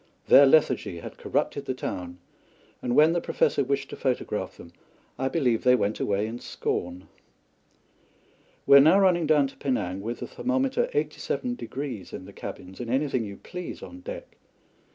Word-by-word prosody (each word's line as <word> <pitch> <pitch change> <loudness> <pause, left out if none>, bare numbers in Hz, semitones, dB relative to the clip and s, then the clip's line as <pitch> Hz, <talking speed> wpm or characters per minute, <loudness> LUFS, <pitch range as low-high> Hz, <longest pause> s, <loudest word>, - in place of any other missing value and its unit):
Their 140 0 +9
lethargy 130 - +3
had - - -10
corrupted - - -1
the - - -2
town, 90 -1 -5 0.6
and 120 0 -1
when 155 +2 +6
the 175 - 0
Professor 140 - +1
wished 135 +1 -2
to - - -5
photograph 130 -3 -2
them, 85 0 -13 0.5
I 130 - 0
believe 130 -7 +1
they 125 0 +6
went 105 -3 -1
away 100 +1 0
in 115 +2 -5
scorn. 90 -5 -4 1.6
We 140 - +8
are - - +10
now 160 +8 +6
running 175 -4 +3
down 150 -2 +4
to - - -18
Penang 100 -9 -2
with 115 +3 -4
the - - -4
thermometer 265 - 0
87° 140 - -3
in - - -7
the - - -12
cabins, 95 +1 -9
and 120 -2 -5
anything 130 -2 0
you 100 -1 -8
please 180 -1 -8
on 270 - -10
deck. - - -9
135 Hz, 165 wpm, -26 LUFS, 110-165 Hz, 1.6 s, are